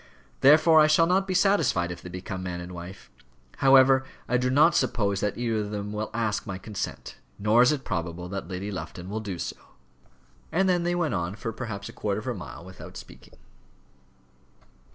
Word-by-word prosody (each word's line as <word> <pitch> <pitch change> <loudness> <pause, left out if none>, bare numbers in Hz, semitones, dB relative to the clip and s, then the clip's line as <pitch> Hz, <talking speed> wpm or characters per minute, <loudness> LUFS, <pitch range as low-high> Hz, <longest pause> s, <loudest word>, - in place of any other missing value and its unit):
Therefore 155 +3 +6
I 155 - +6
shall 155 +2 +5
not 190 +3 +2
be 185 - -1
satisfied 175 - +2
if 85 -1 -8
they 90 - -9
become 95 +1 -6
man 90 -1 -4
and 90 +1 -8
wife. 85 -7 -10 0.5
However, 135 -1 +6 0.2
I 125 - +2
do 125 +1 0
not 150 +6 +5
suppose 100 -6 +1
that 105 0 -2
either 115 -2 -1
of 105 -1 -3
them 105 0 -4
will 105 +1 -3
ask 110 -2 -2
my 95 -2 -4
consent; 100 +1 -6 0.2
nor 105 +4 +4
is 125 - +6
it 145 -3 -3
probable 85 -3 -3
that 100 -2 -5
Lady 95 +3 -5
Lufton 90 -1 -7
will 110 - -2
do 100 -5 -5
so." - - -5 0.9
And 190 +3 +2
then 180 -2 +2
they 175 +1 0
went 170 -3 0
on 85 +1 -2
for 115 0 -5
perhaps 105 -5 -6
a - - -10
quarter 105 -1 -2
of 110 - -10
a 125 - -1
mile 90 -4 -9
without 95 0 -11
speaking. - - -14
105 Hz, 195 wpm, -26 LUFS, 95-135 Hz, 0.9 s, Therefore